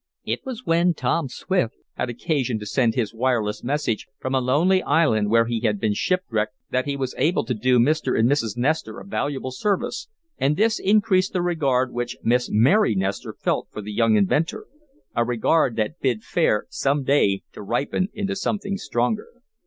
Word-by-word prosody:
It - - -1
was 255 -2 -7
when 170 +1 +3
Ton 155 -2 0
Swift 180 -3 -1 0.2
had 125 - -3
occasion 125 -1 -1
to 105 - -7
send 115 +1 +1
his 115 -4 -1
wireless 115 -3 0
message 135 -4 -1
from 130 - -4
a 130 - +3
lonely 165 +9 +3
island 110 - +2
where 115 +1 +4
he 115 0 -1
had 105 -3 0
been 105 0 +1
shipwrecked 110 - -1 0.2
that 130 +3 0
he 140 -1 -2
was 130 -2 -3
able 165 -4 +2
to 125 - -1
do 125 +3 +2
Mr. 150 +6 +2
and 110 - +4
Mrs. 120 -6 0
Nestor 150 +6 -1
a - - -11
valuable 140 -9 -3
service, 210 - -2 0.3
and 145 +3 +1
this 220 +2 +2
increased 195 -2 +2
the 180 - 0
regard 135 -8 +1
which 120 0 -3
Miss 125 +2 +2
Mary 125 - +4
Nestor 95 +1 -2
felt - - -1
for 105 - -7
the 105 +1 -6
young 115 0 +3
inventor, 150 - +1 0.5
a 120 - +3
regard 120 +3 +1
that 115 +10 -2
bid 120 -5 0
fair, 120 -6 +1
some 140 +1 0
day, 105 -9 +2
to - - -9
ripen 130 - -1
into 200 -2 -3
something 200 0 -2
stronger. 125 - -1
130 Hz, 185 wpm, -23 LUFS, 115-170 Hz, 0.5 s, where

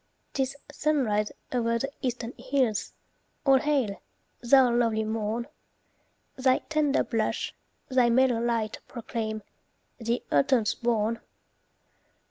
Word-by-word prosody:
'Tis 265 0 -1 0.2
sunrise 260 -9 +1 0.2
o'er 230 -1 +1
the 275 +4 -3
eastern 245 -2 -3
hills. 255 -3 0 0.5
All 270 -1 +6
hail! 265 -9 0 0.4
thou 250 0 +6
lovely 230 -2 +2
morn! 220 +1 -2 0.9
Thy 260 0 +3
tender 305 -2 +2
blush, 225 -2 -1 0.3
thy 255 -2 +3
mellow 245 -1 +3
light 230 -2 -1
Proclaim 220 -2 -4 0.6
"The 235 +1 -1
autumn's 210 - +3
born." 230 -1 0
235 Hz, 100 wpm, -27 LUFS, 220-260 Hz, 0.9 s, All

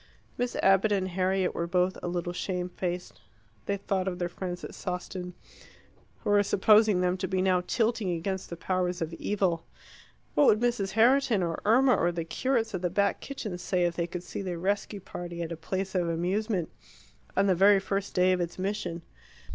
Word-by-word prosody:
Miss 245 0 -2
Abbott 195 +2 +4
and 190 -2 +1
Harriet 185 +1 0
were 170 - -2
both 180 +1 +1
a - - -4
little 175 0 -2
shame 180 0 -3
faced. 180 - -5 0.5
They 200 - 0
thought 195 -1 -1
of 180 -2 -2
their 175 -1 -2
friends 180 0 -5
at - - -7
Sawston, 180 0 -5 0.9
who - - 0
were 205 0 +6
supposing 210 0 +4
them 180 0 +1
to - - -2
be 190 - -1
now 185 -1 +3
tilting 225 -4 +1
against 185 +3 -3
the 170 - -6
powers 180 -1 -1
of 165 +1 -5
evil. 175 -2 -1 0.7
What 290 - +5
would 210 - +5
Mrs. 235 -5 0
Herriton, 230 -2 +4
or 165 -1 -2
Irma, 250 +4 +5
or 175 - +2
the 170 -1 -4
curates 230 +4 0
at 185 - -2
the 180 - 0
Back 200 +2 +1
Kitchen 215 -10 -5
say 180 0 0
if 170 -1 0
they 170 -1 -1
could 175 0 -6
see 180 - -6
the 180 -3 -3
rescue 200 +3 -2
party 175 -1 -6
at 165 - -6
a - - -2
place 190 +4 -3
of 175 -3 +1
amusement 180 +2 -1 0.7
on 195 - +4
the 195 - +4
very 195 +3 +6
first 195 +1 -3
day 185 0 +4
of 180 -1 +1
its 175 0 -4
mission? 185 -3 -3
185 Hz, 195 wpm, -28 LUFS, 175-200 Hz, 0.9 s, were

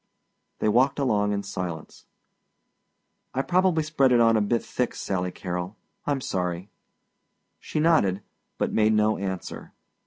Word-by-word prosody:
They - - 0
walked 125 +6 +3
along 105 -7 +1
in 100 0 -1
silence. 85 -5 -6 1.3
"I 135 - +1
probably 180 -2 +2
spread 145 -4 +2
it 120 - +5
on 115 -1 +5
a 110 - +3
bit 115 +3 0
thick 125 -1 -2
Sally 90 -2 -2
Carrol. 90 +2 -5 0.3
I'm 140 -2 0
sorry." 90 -2 -3 0.9
She - - -3
nodded 105 - +3 0.3
but - - -1
made 110 0 +3
no 105 0 +2
answer. 95 -2 -5
110 Hz, 135 wpm, -26 LUFS, 95-135 Hz, 1.3 s, it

